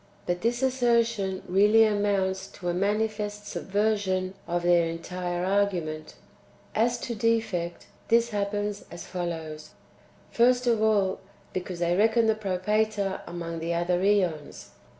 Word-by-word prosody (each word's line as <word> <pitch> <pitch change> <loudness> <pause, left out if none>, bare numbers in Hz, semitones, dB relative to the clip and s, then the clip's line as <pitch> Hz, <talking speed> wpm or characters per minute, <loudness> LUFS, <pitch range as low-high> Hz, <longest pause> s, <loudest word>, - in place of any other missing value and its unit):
But 175 0 -1
this 240 +3 0
assertion 235 -7 +1
really 210 +4 +5
amounts 200 -2 0
to 175 -3 -4
a - - 0
manifest 210 +2 -1
subversion 195 -3 -1
of 175 0 -1
their 175 -1 +4
entire 175 +1 -3
argument. 180 -6 -1 0.6
As 235 +3 +2
to 240 - -3
defect, 220 -6 -1 0.2
this 235 +1 +3
happens 205 -1 -2
as 170 - -9
follows: 160 -4 -5 0.6
first 245 +1 +3
of 230 -3 +2
all, 205 -3 +2 0.3
because 185 -1 -4
they 175 0 +1
reckon 225 +3 +3
the 220 - +4
Propator 210 0 -1
among 170 -1 -5
the 170 +1 -2
other 175 +1 +1
^ons. 185 -7 0
200 Hz, 130 wpm, -27 LUFS, 175-220 Hz, 0.6 s, really